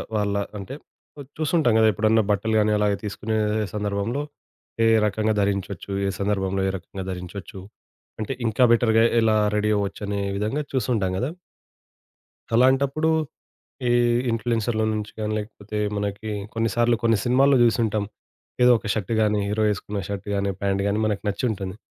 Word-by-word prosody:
వాళ్ళ 105 -1 0 0.2
అంటే 100 +6 -7 0.6
చూస్తుంటాం 155 -5 +2
గదా 110 - +5
ఎప్పుడన్నా 110 +2 +3
బట్టలు 110 +2 0
గాని, 105 0 +2
అలాగే 105 -1 +1
తీసుకునే 105 +2 -3 0.4
సందర్భంలో 105 +5 -2 0.6
ఏ - - +5 0.2
రకంగా 110 +1 0
ధరించొచ్చు. 100 -1 -2 0.2
ఏ - - +1
సందర్భంలో 95 -1 0
ఏ - - 0
రకంగా 95 +2 -8
ధరించొచ్చు. 95 +2 -7 0.6
అంటే 110 +5 -2
ఇంకా 115 +3 +2
బెటర్‌గా 115 -1 +4 0.2
ఎలా 110 -1 +3 0.2
రెడీ 105 0 +1
అవ్వొచ్చనే 100 0 -3 0.2
విధంగా 110 +9 -1
చూసి 130 - 0
ఉంటాం 95 -3 0
గదా! 130 - -1 1.3
అలాంటప్పుడు 135 +5 +3 0.8
ఈ - - +2 0.4
ఇన్‌ఫ్లుయెన్సర్ల 115 -1 0
నుంచి 105 0 -4
గానీ, 105 0 -1
లేకపోతే 105 0 -7 0.2
మనకి 105 +1 -3 0.2
కొన్ని 115 0 0
సార్లు 120 0 +3
కొన్ని 115 -2 +3
సినిమాల్లో 135 +2 +4
జూసుంటాం. 110 -3 +2 0.6
ఏదో 125 0 +7
ఒక 110 - -10
షర్ట్ 110 0 -3
గానీ, 105 -1 +2
హీరో 110 +1 0
ఏసుకున్న 100 0 -4
షర్ట్ 100 -2 -5
గాని 100 0 0
ప్యాంట్ 100 0 +1
గాని 100 - 0
మనకి 105 -2 -1
నచ్చుంటుంది. 100 -2 -2
105 Hz, 140 wpm, -24 LUFS, 100-115 Hz, 1.3 s, ఏదో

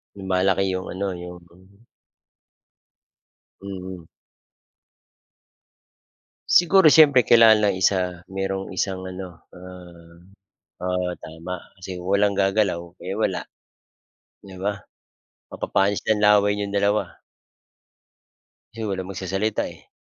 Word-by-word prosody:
Lumalaki 95 0 +1
yung 95 0 -4
ano, 100 +2 -3 0.2
yung 90 0 -9 2.2
Mhm. 95 -3 -8 2.4
Siguro 175 0 +5
siyempre 145 -6 +6
kailangan 115 -2 +7
lang 105 -2 +2
isa 90 -2 0
mayro'ng 95 0 -3
isang 95 0 -2
ano, 90 -2 -9
ah 90 -2 -13 0.7
oo, 90 -1 -1
tama. 85 +3 -7 0.2
Kasi 90 -1 -7
kung 90 - -6
walang 100 0 +3
gagalaw, 95 -3 +1 0.2
eh, 95 - -3
wala. 110 - -1 1.0
'Di 95 -2 -12
ba? 100 +1 -3 0.7
Mapapanis 100 +1 -1
lang 110 -1 +1
laway 105 -1 +4
niyong 100 -1 -3
dalawa. 100 +1 0 1.6
Kasi 115 0 -7
walang 95 -2 -4
magsasalita, 95 +3 -2
eh. - - -21
95 Hz, 100 wpm, -23 LUFS, 90-100 Hz, 2.4 s, kailangan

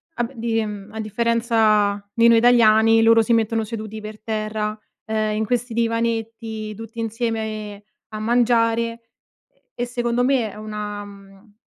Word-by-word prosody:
a 240 - 0
b 235 - -5
di 230 -1 -1
a 210 0 -6
differenza 215 -2 +1
di 230 0 +4
noi 230 0 +6
italiani, 225 -2 +5
loro 225 0 +6
si 225 +2 +1
mettono 225 0 +1
seduti 220 0 -6
per 215 0 -9
terra, 215 -1 -3 0.3
ehm, 215 -1 -1
in 220 +1 -1
questi 245 +1 -2
divanetti 225 -1 -2
tutti 225 +2 -9
insieme, 220 -2 -3
ehm, 200 - -14 0.3
a 215 - -6
mangiare 230 0 +2
e 230 0 -7 0.8
e - - +1
secondo 240 0 -1
me 250 -5 +1
è - - -13
una 210 -1 -6
mhmm, 200 +1 -16
225 Hz, 155 wpm, -22 LUFS, 215-230 Hz, 0.8 s, noi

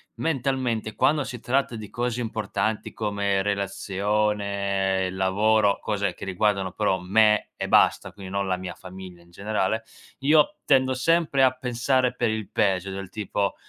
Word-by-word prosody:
mentalmente 130 -7 -1
quando 150 -1 +2
si 125 -3 -7
tratta 130 0 0
di 110 -2 -8
cose 120 0 -2
importanti, 110 -1 -2
come 100 -2 0
relazione, 100 -1 -1
lavoro, 100 +2 +2
cose 100 -3 -1
che - - -8
riguardano 95 0 0
però 100 -3 0
me 105 +3 +3
e - - -4
basta, - - +3
quindi 95 -2 -10
non 100 0 -1
la 95 -1 0
mia 90 -1 -6
famiglia 90 -1 -11
in 85 - -23
generale. 105 +3 -1 0.4
Io 150 +2 +3
tendo 130 -2 +3
sempre 155 -1 +2
a 130 - +6
pensare 125 0 0
per 120 -3 0
il 110 -2 -3
peggio, 95 -1 +1
del 95 -1 -6
tipo: 100 -1 -2
105 Hz, 150 wpm, -25 LUFS, 95-120 Hz, 0.4 s, a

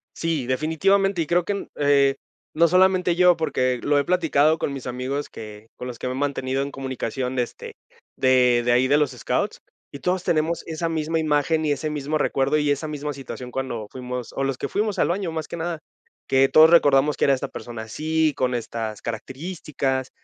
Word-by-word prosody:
Sí, 160 -7 -2
definitivamente, 175 +7 +1
y 160 - -2
creo 175 +1 +2
que, 205 - -1
mm, 200 - -5
eh, 140 -1 +3 0.4
no 170 +2 +5
solamente 185 0 +3
yo, 180 -1 +5
porque 130 -6 0
lo 145 0 +3
he - - +1
platicado 160 -2 +2
con 140 - -2
mis 135 -2 -7
amigos 130 +3 -3
que 105 0 -10
con 125 - -7
los 120 -3 -7
que - - -3
me 125 - -2
he - - -5
mantenido 135 -1 -1
en 140 - -5
comunicación 130 -1 -4
de 125 - +2
este 120 - -9 0.4
de 125 -2 +4
de 120 - +3
ahí 125 +2 +3
de 145 +2 +4
los 150 -2 +1
Scouts 125 - -2 0.3
y 140 - -7
todos 180 +2 -1
tenemos 165 0 0
esa 165 +1 -3
misma 160 0 -1
imagen 155 +1 +1
y 150 - +1
ese 145 +2 -2
mismo 150 +1 -2
recuerdo 140 0 +1
y 150 -1 +1
esa 145 +2 -1
misma 150 -1 -4
situación 130 -2 -8
cuando 120 -5 -4
fuimos 125 -1 -6
o 135 - -2
los 135 -1 -1
que - - -3
fuimos 210 0 -1
al - - +2
baño, 180 -1 -1
más 160 -1 -4
que - - -6
nada, 170 -1 -3 0.5
que 135 0 +4
todos 155 +1 +7
recordamos 145 -3 +5
que - - +1
era 140 - +4
esta 130 - -4
persona 115 -2 -8
así 155 +7 0
con 125 -1 0
estas 115 -2 -5
características 135 - -3
145 Hz, 210 wpm, -23 LUFS, 130-160 Hz, 0.5 s, todos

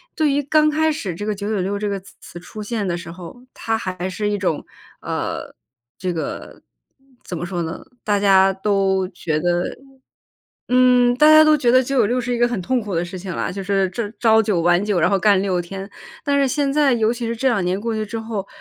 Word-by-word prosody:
对 310 -3 +2
于 285 - +1
刚 305 +2 +3
开 315 +1 +2
始 210 - -4
这 205 - -6
个 215 - -1
996 200 -1 -2
这 210 - -2
个 200 -1 -2
词 190 - -18
词 175 - -11
出 210 +4 -9
现 210 -2 -3
的 175 -1 -1
时 170 0 -8
候， 180 +7 -11
它 225 0 -2
还 185 -3 -4
是 205 +3 -3
一 205 - 0
种， 170 -5 -1 0.4
呃， - - -4 0.5
这 185 -1 -2
个 160 - -6 0.6
怎 180 - -6
么 175 - -4
说 175 -1 -3
呢， 165 0 -5 0.2
大 205 -1 +1
家 195 -1 +5
都 190 -1 0
觉 160 -4 -2
得， 175 +1 -1 0.9
嗯， 250 -1 +4
大 300 - +5
家 310 0 +9
都 310 0 +5
觉 245 -4 +2
得 255 +1 +6
996 250 -2 +1
是 245 +1 -3
一 240 - -1
个 240 - +4
很 240 -5 -3
痛 255 +7 0
苦 205 -4 -5
的 170 +1 0
事 185 +2 -7
情 185 0 -6
啦。 - - -2
就 195 +2 -6
是 195 -1 +1
朝 210 +3 -3
朝 220 -1 +5
9 200 -5 0
晚 175 +2 +3
9， 205 -4 0
然 180 - +3
后 195 - +2
干 200 0 +4
6 185 -3 0
天。 195 +3 -7 0.3
但 285 -1 +1
是 275 - +3
现 275 +1 0
在 290 -2 +3
尤 225 -1 +2
其 240 -1 -4
是 230 - -2
这 260 +4 +1
2 215 -7 +1
年 185 +3 -1
过 230 0 -2
去 215 0 -2
之 225 +2 -5
后， 220 -3 -5
205 Hz, 230 characters per minute, -20 LUFS, 185-245 Hz, 0.9 s, 家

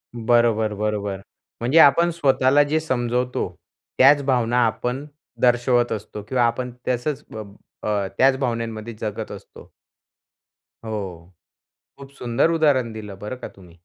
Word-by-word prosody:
बरोबर, 115 -2 +2
बरोबर. 105 -2 -3 0.4
म्हणजे 125 +7 +1
आपण 170 +4 +6
स्वतःला 140 -3 +3
जे 155 +2 0
समजवतो. 125 -4 -1 0.5
त्याच 140 +2 +6
भावना 125 -2 +2
आपण 125 +5 -2 0.4
दर्शवत 120 0 +3
असतो 105 -1 -5
किंवा 125 -2 +2
आपण 125 +2 -1 0.2
तसच 135 +4 -1
अ, 110 - -5 0.5
अ, 100 -2 0
त्याच 135 0 +4
भावनांमध्ये 115 -3 -3
जगत 105 -2 -4
असतो. - - -12 1.1
हो. 95 -5 -6 0.7
खूप 135 0 -12
सुंदर 120 +6 +1
उदाहरण 145 -8 +2
दिलं 105 -3 -8
बरं 105 +5 -6
का - - -7
तुम्ही. 90 -2 -17
120 Hz, 125 wpm, -22 LUFS, 110-130 Hz, 1.1 s, आपण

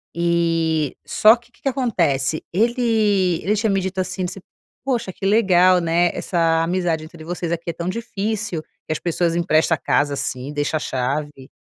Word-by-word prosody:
E 165 -3 +1
só 215 +2 +6
que 240 0 -20
que - - -28
que 275 - 0
acontece? 170 - 0
Ele 210 -5 +2
ele 210 +3 +1
tinha 215 +1 0
me 195 -1 +2
dito 190 +1 -4
assim, 185 0 -2
você 185 - -8 0.5
"Poxa 245 -8 -1
que 195 - -7
legal, 185 -3 +4
né, 170 +1 +2
essa 165 -2 +1
amizade 170 -2 -1
entre 160 0 -12
vocês 170 0 -4
aqui 170 0 -3
é - - -2
tão 170 +2 -5
difícil 215 -3 -3
que 155 - -13
as 155 - -1
pessoas 170 -1 0
empresta 170 -1 +2
a - - -9
casa 145 0 +1
assim, 135 0 -4
deixa 145 +1 -1
a - - -3
chave". 135 +1 -3
175 Hz, 180 wpm, -21 LUFS, 160-200 Hz, 0.5 s, só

